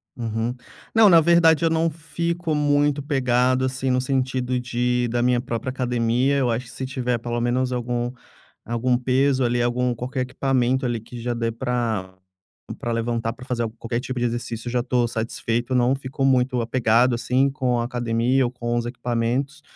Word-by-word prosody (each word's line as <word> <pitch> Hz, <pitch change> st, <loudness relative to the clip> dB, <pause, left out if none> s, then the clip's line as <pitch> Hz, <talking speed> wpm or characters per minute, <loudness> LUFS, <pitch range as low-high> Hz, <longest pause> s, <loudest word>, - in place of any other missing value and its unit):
Uhum. 115 Hz, 0 st, -2 dB, 0.4 s
Não, 220 Hz, -3 st, +7 dB
na 165 Hz, -2 st, +7 dB
verdade 170 Hz, -1 st, +4 dB
eu 165 Hz, -, +4 dB
não 165 Hz, +1 st, +2 dB
fico 165 Hz, +1 st, -3 dB
muito 145 Hz, -1 st, +2 dB
pegado, 130 Hz, -2 st, +2 dB
assim 130 Hz, 0 st, -1 dB
no 125 Hz, 0 st, +2 dB
sentido 130 Hz, -1 st, -1 dB
de 125 Hz, 0 st, 0 dB
da 120 Hz, +1 st, 0 dB
minha 125 Hz, 0 st, +3 dB
própria 120 Hz, 0 st, -4 dB
academia, 125 Hz, +1 st, +1 dB
eu 130 Hz, -3 st, +1 dB
acho 120 Hz, +2 st, -1 dB
que 120 Hz, -, -12 dB
se 130 Hz, -, -5 dB
tiver 125 Hz, -2 st, -1 dB
pelo 120 Hz, +1 st, -3 dB
menos 125 Hz, +2 st, 0 dB
algum 120 Hz, 0 st, -2 dB, 0.5 s
algum 120 Hz, +2 st, 0 dB
peso 130 Hz, +1 st, +2 dB
ali, 120 Hz, 0 st, +1 dB
algum 125 Hz, +1 st, 0 dB
qualquer 130 Hz, +3 st, -4 dB
equipamento 130 Hz, 0 st, 0 dB
ali, 120 Hz, -2 st, -1 dB
que 120 Hz, +2 st, -10 dB
já 120 Hz, +1 st, -2 dB
dê 115 Hz, -1 st, -1 dB
pra 115 Hz, -6 st, -2 dB, 0.6 s
pra 120 Hz, -, -3 dB
levantar 115 Hz, 0 st, -1 dB
pra 125 Hz, +2 st, -12 dB
fazer 120 Hz, -2 st, -1 dB
al 115 Hz, -, -2 dB
qualquer 115 Hz, +1 st, -4 dB
tipo 130 Hz, -1 st, -5 dB
de 120 Hz, -, +2 dB
exercício, 120 Hz, 0 st, -4 dB
já 120 Hz, 0 st, 0 dB
tô 120 Hz, -1 st, +1 dB
satisfeito, 115 Hz, +2 st, -2 dB
não 125 Hz, +1 st, +3 dB
fico 135 Hz, 0 st, -5 dB
muito 125 Hz, -1 st, +2 dB
apegado, 120 Hz, +1 st, +2 dB
assim, 125 Hz, +3 st, +1 dB
com 125 Hz, -3 st, 0 dB
a 115 Hz, -, -1 dB
academia 120 Hz, +2 st, +1 dB
ou 120 Hz, -, 0 dB
com 120 Hz, -1 st, -2 dB
os 120 Hz, -, 0 dB
equipamentos, 120 Hz, +4 st, -2 dB
125 Hz, 180 wpm, -23 LUFS, 120-130 Hz, 0.6 s, Não